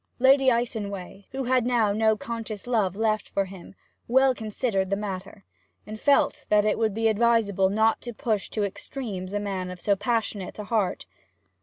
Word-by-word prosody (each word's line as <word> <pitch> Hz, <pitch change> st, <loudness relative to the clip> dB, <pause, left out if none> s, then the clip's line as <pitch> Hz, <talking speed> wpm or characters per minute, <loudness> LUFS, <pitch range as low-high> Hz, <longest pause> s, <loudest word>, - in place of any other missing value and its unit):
Lady 265 Hz, +1 st, +5 dB
Icenway, 205 Hz, -5 st, -3 dB
who 270 Hz, 0 st, -3 dB
had 255 Hz, -1 st, +2 dB
now 235 Hz, -4 st, +2 dB
no 220 Hz, 0 st, +2 dB
conscious 225 Hz, -2 st, -6 dB
love 215 Hz, -7 st, +1 dB
left 215 Hz, 0 st, 0 dB
for 195 Hz, -, 0 dB
him, 190 Hz, 0 st, -12 dB, 0.3 s
well 265 Hz, +2 st, +4 dB
considered 215 Hz, -4 st, -2 dB
the 200 Hz, -, +1 dB
matter, 190 Hz, -, -6 dB, 0.4 s
and 215 Hz, +1 st, -8 dB
felt 285 Hz, +3 st, +2 dB
that 210 Hz, 0 st, +4 dB
it 215 Hz, -, +1 dB
would 220 Hz, -3 st, +1 dB
be 225 Hz, 0 st, +2 dB
advisable 220 Hz, -4 st, +3 dB
not 220 Hz, +2 st, +2 dB
to 240 Hz, -, -6 dB
push 215 Hz, -2 st, -2 dB
to 215 Hz, -, -2 dB
extremes 195 Hz, -2 st, -5 dB
a 205 Hz, -, -1 dB
man 195 Hz, -3 st, -3 dB
of 180 Hz, 0 st, -8 dB
so 200 Hz, +3 st, +2 dB
passionate 210 Hz, -2 st, -2 dB
a 210 Hz, -, -5 dB
heart. 210 Hz, -3 st, -1 dB
215 Hz, 175 wpm, -26 LUFS, 200-235 Hz, 0.4 s, Lady